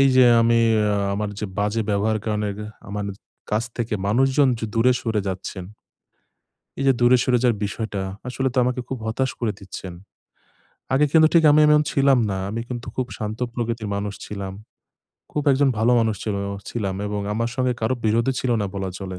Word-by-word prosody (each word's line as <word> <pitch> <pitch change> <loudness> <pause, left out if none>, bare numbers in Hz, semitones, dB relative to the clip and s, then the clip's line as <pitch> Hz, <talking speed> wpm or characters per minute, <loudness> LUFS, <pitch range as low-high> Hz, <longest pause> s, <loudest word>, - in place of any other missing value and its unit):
এই 135 - +6
যে 130 - +8 0.2
আমি 115 0 +4 0.2
অ্যা 105 -1 +1 0.2
আমার 105 0 -2
যে 105 - -2
বাজে 105 +2 0
ব্যবহার 110 +2 +1
কারণের 105 -2 -2
এহ 105 - -7 0.2
আমার 105 0 -3 0.5
কাছ 110 +2 +1
থেকে 115 -2 -2
মানুষজন 135 +5 +3
যে 115 - -4
দূরে 125 +3 +4
সরে 110 -3 -1
যাচ্ছেন। 95 0 -5 1.1
এই 135 - -1
যে 135 - +6
দূরে 120 +1 +6
সরে 125 -1 +3
যাওয়ার 120 -4 +3
বিষয়টা, 100 -1 -3 0.3
আসলে 130 +1 -1
তো - - +1
আমাকে 125 0 -1
খুব 130 - -4
হতাশ 130 +3 0
করে 110 -3 0
দিচ্ছেন। 95 -1 -8 1.0
আগে 145 +3 +4
কিন্তু 160 -1 +6
ঠিক 165 -1 +5
আমি 150 - +5
এমন 150 0 +5
ছিলাম 135 -2 +4
না। 95 - -2
আমি 115 +2 -3
কিন্তু 125 -1 -5
খুব 130 - -1
শান্ত 110 +1 -4
প্রকৃতির 115 -3 -3
মানুষ 100 0 -3
ছিলাম। 100 -2 -6 0.8
খুব 150 - -1
একজন 140 +1 +3
ভালো 120 +3 +3
মানুষ 110 -2 0
ছিলাম 100 -2 -2 0.3
ছিলাম 100 -5 -2
এবং 105 0 -3
আমার 115 +2 -1
সঙ্গে 130 -1 +1
কারো 110 +3 +1
বিরোধই 115 +4 +2
ছিল 130 - -1
না - - -1
বলা 95 -1 -3
চলে। 95 -2 -6
115 Hz, 190 wpm, -23 LUFS, 105-125 Hz, 1.1 s, যে